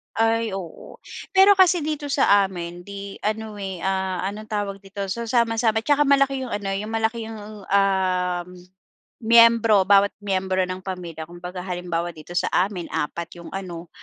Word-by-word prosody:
Ay 225 -1 +1
oo. 180 -4 -9 0.4
Pero 385 +1 +8
kasi 355 -4 +5
dito 300 -1 -3
sa 205 -8 +4
amin 175 -1 -7
'di 200 0 -8
ano, 215 0 -3
eh, 190 -3 -5
ah, 190 -1 -1
anong 215 +1 -8
tawag 205 -2 -3
dito? 200 +1 -7
So, 235 +1 -3
sama-sama 225 -2 +2
at - - -41
saka 290 -1 +3
malaki 275 -1 +3
iyong 240 - -6
ano, 205 -1 -3
iyong 210 +3 -4
malaki 225 +1 0
iyong, 210 -2 -9
um, 185 -3 +1 0.7
miyembro 230 -2 +6
bawat 200 0 +5
miyembro 190 -1 0
ng 185 0 -3
pamilya. 175 -4 -6
Kumbaga 180 +2 -8
halimbawa 175 -1 -3
dito 155 +2 -11
sa - - +1
amin 185 -2 0
4 170 +3 -4
iyong 170 - -10
ano, 175 -3 -6
200 Hz, 165 wpm, -23 LUFS, 180-225 Hz, 0.7 s, Pero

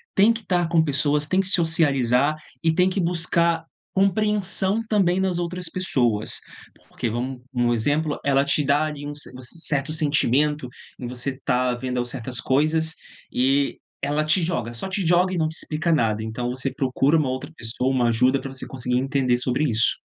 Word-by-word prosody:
tem 205 +4 +5
que 230 - -3
estar 175 -5 0
com 170 -1 +4
pessoas, 145 0 +1
tem 185 - +1
que 190 - +1
socializar 150 - +3 0.3
e 165 - +3
tem 180 +2 +3
que 185 0 -1
buscar 170 -1 +1 0.3
compreensão 195 +1 +1
também 190 -4 +2
nas 190 -2 0
outras 175 0 -3
pessoas, 125 - 0 0.5
porque 120 - -4
vamos 125 +2 -4
um 120 -1 +1
exemplo, 145 +6 0
ela 140 0 +2
te 145 +1 +1
dá 145 +2 +2
ali 150 -2 -6
um 145 - -5 0.3
certo 140 +1 0
sentimento 150 -2 +1 0.3
em 125 - -5
você 125 +2 -2
estar 125 -1 0
vendo 125 0 -3
certas 125 0 -4
coisas 155 +5 +1 0.4
e 135 +2 +1 0.2
ela 150 +1 0
te 160 +4 +3
joga, 120 -9 -2
só 120 +11 -4
te 190 -1 -2
joga 180 +2 +3
e - - -2
não 155 -1 +1
te 160 - -6
explica 155 +3 -1
nada, 110 -8 +1
então 120 +2 -4
você 130 +1 -2
procura 135 +3 +1
uma 145 -4 0
outra 130 +5 -5
pessoa, 125 +3 -3
uma 125 -2 +2
ajuda 125 +4 +3
para 135 - -7
você 130 - -4
conseguir 125 -1 -2
entender 130 -2 +1
sobre 125 +3 0
isso. 115 -1 +1
145 Hz, 180 wpm, -23 LUFS, 125-170 Hz, 0.5 s, tem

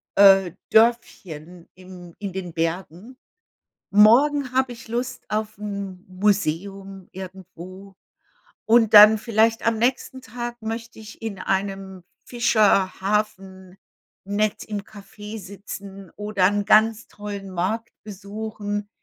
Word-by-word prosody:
äh, 195 -2 +6 0.2
Dörfchen 180 -8 0
im 180 -2 -13
in 200 -3 -5
den 185 -2 -5
Bergen.“ 175 +8 -4 0.7
Morgen 250 +7 +5
habe 260 -1 +1
ich 230 -1 -13
Lust 240 +3 -4
auf 215 0 -3
'n 200 -3 -6
Museum 195 0 -2
irgendwo 185 +1 -11 0.7
und 225 -1 +4
dann, 210 +1 +10
vielleicht 225 +1 +1
am 230 -1 +1
nächsten 255 +2 -1
Tag, 240 0 -7
möchte 225 +1 -6
ich 220 0 -12
in 220 -4 -5
einem 195 -1 -3 0.2
Fischerhafen 195 -4 0 0.5
nett 205 +1 -1
im 210 -2 -5
Café 210 +1 -11
sitzen 195 -1 -10
oder 210 -2 -1
'n 205 +1 0
ganz 220 +1 +3
tollen 205 -2 -8
Markt 195 +6 -2
besuchen. 205 0 -6
205 Hz, 110 wpm, -23 LUFS, 190-220 Hz, 0.7 s, dann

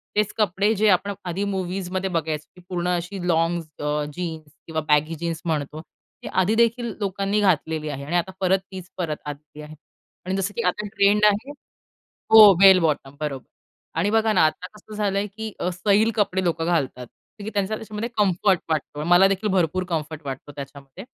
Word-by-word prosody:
तेच 210 0 +1
कपडे, 205 +1 +2
जे 215 +2 +2
आपण 200 +2 +2
आधी 180 +3 -2
मूव्हीजमध्ये 190 -1 -3
बघायचं 155 -3 -2
की, 180 - -15
पूर्ण 175 -1 -2
अशी 175 +3 -6
लॉन्ग्स 165 0 +1
अ, 150 0 -1
जीन्स 160 -3 -6 0.2
किंवा 160 -1 -2
बॅगी 155 +2 +2
जीन्स 165 0 -4
म्हणतो. 155 -1 -2
ती - - -17
आधी 190 +4 +1
देखील 235 0 +1
लोकांनी 200 +1 -1
घातलेली 160 -4 +1
आहे 140 -1 -5
आणि 170 +4 -3
आता 190 +2 -1
परत 190 0 +2
तीच 185 -1 -9
परत 160 -4 -2
आलेली 150 +1 -9
आहे 150 +1 -10 0.5
आणि 190 +1 -2
जसं 195 +2 -2
की - - +1
आता 205 +3 -1
ट्रेंड 205 +1 +4
आहे 210 +7 +2 0.8
हो, 215 -3 +10
बेल 190 -1 +8
बॉटम, 145 -3 -1
बरोबर. 140 -4 -4 0.5
आणि 200 +5 +1
बघाना 220 -5 +3
आता 180 +3 -4
कसं 210 0 -13
झालंय, 200 -1 0
की 215 +1 -7
अ, 180 - 0
सैल 205 +5 +2
कपडे 190 -3 0
लोकं 165 -1 -1
घालतात. 135 -7 -1
कारण 205 - -16
की 215 - -4
त्यांचा 200 +1 0
त्याच्यामध्ये 220 +1 -5
कम्फर्ट 190 -2 +2
वाटतो. 150 -1 -2
मला 175 +3 +6
देखील 195 +2 -1
भरपूर 185 0 +1
कम्फर्ट 155 -2 -3
वाटतो 135 +2 -6
त्याच्यामध्ये. 140 - -10
180 Hz, 180 wpm, -23 LUFS, 160-205 Hz, 0.8 s, हो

